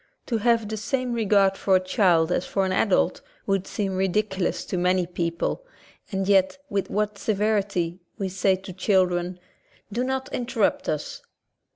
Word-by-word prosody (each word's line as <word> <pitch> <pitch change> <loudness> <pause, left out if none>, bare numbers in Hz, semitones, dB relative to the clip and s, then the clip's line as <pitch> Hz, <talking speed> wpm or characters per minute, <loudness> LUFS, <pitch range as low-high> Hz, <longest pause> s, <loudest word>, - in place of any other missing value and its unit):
To 235 - 0
have 230 -1 +2
the 220 +1 -4
same 255 +3 -1
regard 200 -4 +3
for 190 - +2
a - - +5
child 185 -4 +2
as 180 - +1
for 195 0 0
an 190 - -1
adult 190 +1 +2 0.2
would 195 -1 0
seem 200 -2 -2
ridic 190 +3 +1
ulous 190 -2 -2
to - - -2
many 180 0 +2
people, 170 - -2 0.5
and 190 -1 -1
yet 195 +4 +3
with 200 -1 -1
what 210 0 -1
severity 200 -5 0 0.2
we 195 -3 -2
say 190 +1 +2
to 185 0 -9
children 180 -2 +1 0.5
,"Do 245 - 0
not 265 0 -2
interrupt 240 -4 0
us." 150 -1 -3
195 Hz, 165 wpm, -25 LUFS, 185-215 Hz, 0.5 s, a